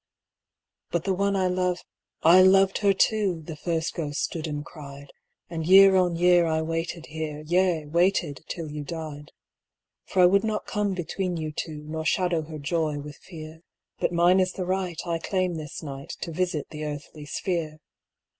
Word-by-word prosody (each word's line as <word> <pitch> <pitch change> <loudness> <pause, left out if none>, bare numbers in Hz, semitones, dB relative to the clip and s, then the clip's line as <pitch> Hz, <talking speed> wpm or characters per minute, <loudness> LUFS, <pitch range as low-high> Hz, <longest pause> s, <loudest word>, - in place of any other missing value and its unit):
'But 170 -1 -1
the 195 - +1
one 200 +1 +1
I 190 -1 +1
love'—'I 180 -1 +2
loved 195 +1 +5
her 200 -1 +4
too,' 195 -4 +1
The 160 - -6
first 165 +1 -2
ghost 150 -3 -3
stood 165 -1 -3
and 145 -1 -4
cried; 140 -3 -11 0.4
'And 165 -2 -4
year 195 +1 +8
on 180 -2 +3
year 175 0 +4
I 160 0 0
waited 165 +1 -3
here, 155 -1 -5
Yea, 175 -1 +2
waited 170 -2 +1
till 160 -3 -5
you 150 0 -5
died. 155 -1 -7 0.7
'For 185 -2 +3
I - - +9
would 195 +3 +4
not 220 -1 -2
come 205 -2 -1
between 180 0 -3
you 155 -1 -3
two, 150 -1 -5
Nor 160 +1 -4
shadow 175 -1 +1
her 155 0 -8
joy 155 0 -1
with 145 0 -8
fear, 160 -2 -11 0.4
But - - +1
mine 175 +2 +4
is 185 0 +1
the 185 - -4
right, 185 -2 -2
I 170 -1 -1
claim 185 +1 -1
this 155 -2 -6
night 140 -2 -7
To 170 - -4
visit 170 -3 -2
the 155 0 -6
earthly 150 0 -7
sphere. 165 -2 -2
170 Hz, 175 wpm, -26 LUFS, 155-185 Hz, 0.7 s, I